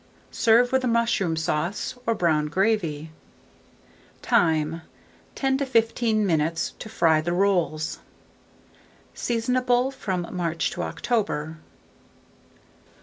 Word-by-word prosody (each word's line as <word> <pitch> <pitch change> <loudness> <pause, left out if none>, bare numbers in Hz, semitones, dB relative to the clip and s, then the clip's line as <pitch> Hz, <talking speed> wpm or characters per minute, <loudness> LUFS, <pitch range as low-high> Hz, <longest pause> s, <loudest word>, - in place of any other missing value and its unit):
Serve 240 +2 +4
with 260 0 +2
mushroom 230 -8 +1
sauce 160 +7 -2
or 230 - +2
brown 155 -5 +1
gravy. 165 -4 0 1.1
Time. 160 0 +2 0.5
10 270 -1 0
to 280 - 0
15 225 -3 +1
minutes 165 -1 0
to 220 - -8
fry 160 -6 +3
the 170 +2 -2
rolls. 175 -5 0 1.1
Seasonable 250 +2 0
from 190 -9 -3
March 170 -2 -1
to - - -4
October. 165 -10 -2
190 Hz, 95 wpm, -24 LUFS, 160-235 Hz, 1.1 s, Serve